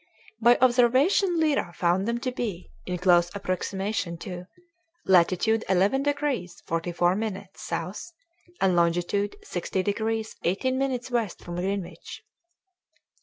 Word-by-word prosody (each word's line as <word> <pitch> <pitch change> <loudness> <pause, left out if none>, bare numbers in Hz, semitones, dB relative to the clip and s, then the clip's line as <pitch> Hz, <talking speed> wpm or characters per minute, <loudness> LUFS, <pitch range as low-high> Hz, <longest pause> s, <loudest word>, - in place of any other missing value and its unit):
By 240 +2 +6
observation 260 - +4
Lyra 290 - +1
found 180 +4 +1
them 235 0 0
to 255 - -1
be 215 -8 -5 0.2
(in 180 0 -2
close 175 -1 +4
approximation 190 -1 -2
to) 180 -2 -7 0.6
latitude 190 +5 +3
11 195 +8 +3
degrees 285 -11 -2
44 175 +2 0
minutes 200 -2 -5
south 185 - -5 0.5
and 185 -2 +3
longitude 175 +4 +1
60 185 - -2
degrees 220 +2 -2
18 230 +9 0
minutes 255 -2 -2
west 230 -6 -2
from 175 0 -6
Greenwich. 180 -2 -4
200 Hz, 120 wpm, -26 LUFS, 175-240 Hz, 0.6 s, By